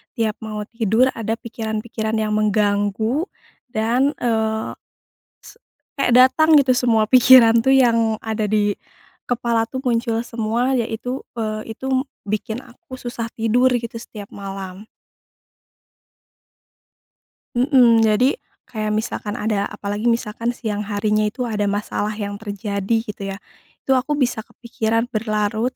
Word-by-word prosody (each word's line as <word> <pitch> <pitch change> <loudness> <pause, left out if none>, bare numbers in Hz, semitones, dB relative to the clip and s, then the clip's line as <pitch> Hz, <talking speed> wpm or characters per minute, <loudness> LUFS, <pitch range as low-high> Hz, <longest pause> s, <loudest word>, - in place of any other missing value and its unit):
tiap 220 -3 -1
mau 215 -1 -5
tidur 230 +3 +1
ada 225 -1 -3
pikiran-pikiran 220 -1 -4
yang 215 -1 0
mengganggu 210 - +1 0.4
dan, 245 +5 +1
eee, 220 -2 -1 0.7
se 465 - -15 0.4
kayak 245 -3 +2
datang 285 +6 +6
gitu 280 -3 +5
semua 240 -3 +3
pikiran 250 -2 +7
tuh, 265 - +6
yang 230 -4 +3
ada 220 -1 -2
di 205 -1 +1 0.5
kepala 235 -2 0
tuh 260 +2 -6
muncul 235 -2 0
semua 235 +1 -1
ya 230 - 0
itu, 245 +4 -4 0.2
eee, 220 -1 -4
itu 265 +3 -5
m 260 +2 +1 0.2
bikin 215 +3 -3
aku 260 +3 -13
susah 240 -2 -5
tidur 245 +3 +2
gitu 235 -1 -3
setiap 210 -3 -10
malam. 195 0 -8 2.7
Mmm, 245 -3 +5
jadi 250 - +2 0.2
kayak 215 -3 -3
misalkan 215 -1 -3
ada 210 -4 -1
apalagi 205 +2 -4
misalkan 230 +1 -1
siang 210 -3 -4
harinya 210 0 +1
itu 245 +4 -4
ada 210 -3 -1
masalah 205 +1 -2
yang 205 -1 -5
terjadi 200 0 -2
gitu 205 -3 -6
ya, 195 - -4 0.5
itu - - -1
aku 265 +3 +2
bisa 255 -6 0
kepikiran 225 0 -2
berlarut 215 +2 -1
225 Hz, 130 wpm, -21 LUFS, 215-245 Hz, 2.7 s, pikiran